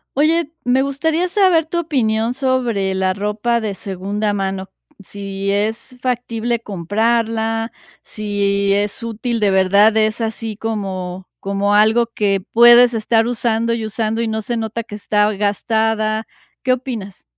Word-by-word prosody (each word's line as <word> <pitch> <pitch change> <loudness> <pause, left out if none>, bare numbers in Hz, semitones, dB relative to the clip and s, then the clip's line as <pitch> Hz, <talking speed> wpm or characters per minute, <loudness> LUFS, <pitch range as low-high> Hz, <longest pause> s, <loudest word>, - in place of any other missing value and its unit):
Oye, 310 +2 +2
me 250 +2 +2
gustaría 315 +6 0
saber 365 -4 +3
tu 335 +2 -4
opinión 235 -8 0
sobre 245 -8 0
la 190 0 +1
ropa 210 +4 -1
de 210 -2 -3
segunda 200 +3 -3
mano, 195 -1 -3 0.3
si 200 0 -5
es 220 +5 -2
factible 240 -2 -1
comprarla, 225 +3 -1 0.3
si 200 -1 0
es 205 +3 -1
útil 230 +1 -3
de 205 -2 +2
verdad, 200 +3 +4
es 215 +1 +1
así 225 -1 -4
como 190 -4 -4
como 200 +1 0
algo 220 +3 +4
que 200 -4 -1
puedes 240 +1 +7
estar 225 +1 +2
usando 230 -1 0
y 225 -1 -2
usando 220 +1 -2
y 230 - -1
no 220 0 -2
se 235 +2 -3
nota 225 +1 -3
que 210 - -9
está 210 0 +1
gastada. 215 +2 0 0.4
¿Qué 255 - +3
opinas? 235 -7 -6
220 Hz, 140 wpm, -18 LUFS, 200-235 Hz, 0.4 s, puedes